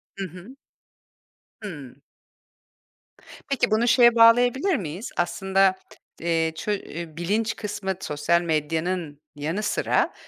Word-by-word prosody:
Hı 195 - -4
hı. 185 - -12 1.1
Hımm. 145 -8 -9 1.5
Peki 270 -5 +1
bunu 230 +3 +2
şeye 240 -1 +6
bağlayabilir 245 +10 +5
miyiz? 185 - -5
Aslında, 190 +2 +2 0.5
eee, 165 -1 +1
ço 210 - -3
e 170 -5 -6
bilinç 215 +6 -1
kısmı 200 -2 -3
sosyal 150 +4 +1
medyanın 160 0 -2 0.2
yanı 160 +9 -3
sıra - - 0
185 Hz, 105 wpm, -24 LUFS, 160-220 Hz, 1.5 s, şeye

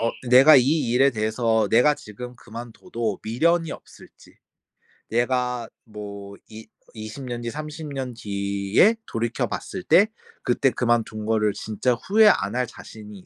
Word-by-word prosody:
어 115 +1 +1 0.2
내가 135 +4 +8
이 135 0 +2
일에 135 +3 +4
대해서 110 -1 0
내가 135 +6 +4
지금 125 -2 -10
그만둬도 115 - -6
미련이 165 +8 +1
없을지, - - -15 0.7
내가 125 0 -1 0.2
뭐 100 -2 -9
이 110 0 -11 0.3
이십 110 +4 -8
년 120 -1 -5
뒤, 120 - -4
30 155 +2 -7
년 130 -2 -4
뒤에 100 - +1
돌이켜 115 +2 -2
봤을 185 - -6
때 200 +4 +5 0.4
그때 130 +2 +2
그만둔 115 -3 -1
거를 105 -2 +1
진짜 110 +3 -1
후회 210 - +4
안 105 - 0
할 125 -1 0
자신이 105 -4 -12
120 Hz, 255 characters per minute, -23 LUFS, 110-135 Hz, 0.7 s, 내가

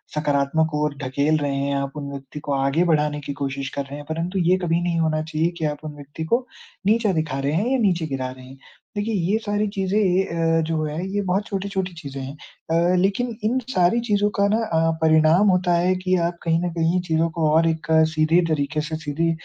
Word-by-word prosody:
सकारात्मक 150 +1 +1
ओर 150 -1 0
ढकेल 140 +4 +1
रहे 145 -2 -1
हैं, 140 0 -1
आप 140 0 -2
उन 140 -1 -5
व्यक्ति 140 +1 -8
को 145 - -2
आगे 140 +4 +2
बढ़ाने 150 -3 +1
की 140 0 -5
कोशिश 135 -1 -3
कर 140 - -1
रहे 140 +1 -8
हैं। 145 - -9
परंतु 170 +4 -2
ये 180 +1 +3
कभी 170 0 +1
नहीं 170 -1 0
होना 155 -1 +1
चाहिए 160 +1 0
कि 160 - -1
आप 150 -1 -1
उन 150 -1 -6
व्यक्ति 145 +2 -8
को 240 +9 +1 0.4
नीचा 220 -1 +3
दिखा 155 -4 -1
रहे 140 +2 -1
हैं 195 +9 +1
या 265 - +3
नीचे 180 -7 +1
गिरा 135 -3 -3
रहे 130 0 -12
हैं। 130 +1 -13 0.4
देखिए, 215 +2 -1
ये 195 +3 +1
सारी 210 -1 -1
चीज़ें 195 +1 +1
ये 190 -2 +3
अ, 165 -1 +1
जो 160 -1 -1
हैं 155 +2 -3
ये 195 +2 -2
बहुत 190 +3 0
छोटी-छोटी 195 -2 -3
चीज़ें 140 -5 -7
हैं। 135 +2 -7 0.4
अ, 170 +2 +3
लेकिन 200 +6 0
इन 245 +4 +2
सारी 180 +6 +3
चीज़ों 205 -1 +2
का 200 - +4
ना 215 - +2
अ, 165 -3 +1
परिणाम 160 +5 +5
होता 180 -1 +2
है 180 +2 +2
कि 185 0 0
आप 170 0 -6
कहीं 165 -1 +2
न 175 - -1
कहीं 165 +2 +1
चीज़ों 160 +1 +2
को 160 -1 +1
और 165 +2 +4
एक 160 -1 -3 0.3
सीधे 160 +2 +3
तरीके 155 0 0
से 155 +1 -4
सीधी 165 +2 0
165 Hz, 225 wpm, -23 LUFS, 150-185 Hz, 0.4 s, परिणाम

